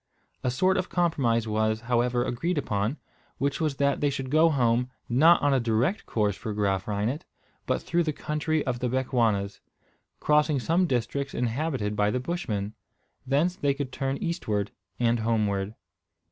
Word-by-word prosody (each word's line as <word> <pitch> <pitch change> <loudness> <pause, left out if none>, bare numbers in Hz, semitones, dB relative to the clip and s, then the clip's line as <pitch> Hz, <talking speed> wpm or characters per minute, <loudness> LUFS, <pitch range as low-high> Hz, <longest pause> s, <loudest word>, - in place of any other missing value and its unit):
A 125 - +1
sort 185 +10 +2
of 185 - -1
compromise 130 -10 +1
was, 110 +1 0
however, 120 +1 +1
agreed 130 +8 -1
upon, 110 0 -1 0.4
which 140 +3 -1
was 155 -3 0
that 140 0 +1
they 145 - +3
should 135 -1 -4
go 160 +2 +5
home, 125 -3 +2 0.2
not 155 +8 +6
on 145 -1 +4
a 135 - +3
direct 120 - 0
course 105 -3 0
for 110 -1 -5
Graaf 100 -2 0
Reinet, 105 +8 -1 0.4
but - - 0
through 170 +1 +1
the 160 -2 0
country 150 +1 -1
of 125 -3 -1
the 125 0 -1
Bechuanas, 115 -6 0 0.6
crossing 150 -1 +3
some 170 +7 +2
districts 135 +1 -2
inhabited 125 -3 -1
by 105 0 +2
the 125 - 0
Bushmen. 110 - -3 0.5
Thence 155 +7 +2
they 140 -5 0
could 140 -2 -4
turn 135 +1 -2
eastward 110 - -2 0.3
and 120 -1 +2
homeward. 105 -2 0
125 Hz, 160 wpm, -27 LUFS, 110-150 Hz, 0.6 s, not